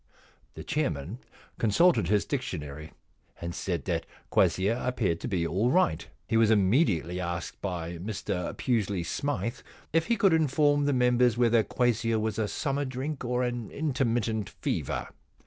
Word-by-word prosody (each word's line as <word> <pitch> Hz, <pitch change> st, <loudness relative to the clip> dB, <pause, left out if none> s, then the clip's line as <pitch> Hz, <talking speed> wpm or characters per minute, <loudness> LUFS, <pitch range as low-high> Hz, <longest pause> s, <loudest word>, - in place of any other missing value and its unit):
The 80 Hz, -, -7 dB
chairman 90 Hz, -, -2 dB, 0.4 s
consulted 115 Hz, -, +4 dB
his 105 Hz, +2 st, +2 dB
dictionary 75 Hz, -, -4 dB, 0.5 s
and 85 Hz, 0 st, -4 dB
said -, -, -3 dB
that -, -, -2 dB, 0.2 s
quassia 105 Hz, +6 st, +2 dB
appeared 110 Hz, -10 st, 0 dB
to -, -, -5 dB
be 90 Hz, -4 st, 0 dB
all 95 Hz, +8 st, +1 dB
right. 130 Hz, -, +2 dB, 0.2 s
He 115 Hz, -, +2 dB
was 115 Hz, -1 st, +5 dB
immediately 100 Hz, -, +2 dB
asked 85 Hz, -1 st, -4 dB
by 85 Hz, -3 st, -4 dB
Mr 90 Hz, -2 st, -3 dB
Pusely 105 Hz, -7 st, 0 dB
Smythe 140 Hz, -, -2 dB, 0.3 s
if 165 Hz, 0 st, +2 dB
he 235 Hz, -, +2 dB
could 195 Hz, -3 st, +4 dB
inform 145 Hz, -2 st, +3 dB
the 145 Hz, -, +2 dB
members 125 Hz, -2 st, +3 dB
whether 120 Hz, -1 st, +4 dB
quassia 115 Hz, -2 st, +1 dB
was 110 Hz, 0 st, -2 dB
a 110 Hz, -, +1 dB
summer 140 Hz, +4 st, -1 dB
drink 135 Hz, +2 st, -4 dB
or 125 Hz, +1 st, 0 dB
an 120 Hz, -3 st, -3 dB
intermittent 120 Hz, -7 st, -1 dB
fever. -, -, -3 dB
115 Hz, 145 wpm, -28 LUFS, 95-130 Hz, 0.5 s, was